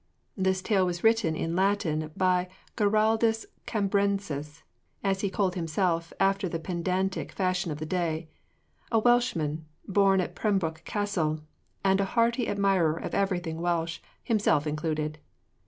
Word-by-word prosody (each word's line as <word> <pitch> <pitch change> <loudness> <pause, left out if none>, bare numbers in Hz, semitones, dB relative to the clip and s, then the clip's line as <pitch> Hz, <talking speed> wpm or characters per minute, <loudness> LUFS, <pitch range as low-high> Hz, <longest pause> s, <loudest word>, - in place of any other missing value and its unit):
This 190 -1 0
tale 200 -4 +2
was 175 -1 -2
written 225 -8 +3
in 165 +1 -2
Latin 180 -5 +1
by 180 -1 +2 0.3
Giraldus 220 +1 +2 0.2
Cambrensis 195 -8 -1 0.4
(as 195 -1 +1
he 200 - 0
called 190 -2 0
himself, 170 0 -1
after 195 -1 +2
the 165 - -2
pedantic 185 +3 -2
fashion 185 -2 0
of 150 - -4
his 155 +1 -5
day), 165 -2 -1 0.6
a 225 - +4
Welshman, 215 -11 +2 0.2
born 195 -1 +4
at 180 - -2
Pembroke 175 -7 0
Castle, 175 -7 -1 0.4
and 195 0 +3
a - - +1
hearty 235 +1 +2
admirer 195 -6 +2
of - - -5
everything 175 -4 -1
Welsh, 170 -1 -1 0.2
himself 205 - +2
included. 155 0 -2
185 Hz, 135 wpm, -28 LUFS, 165-200 Hz, 0.6 s, a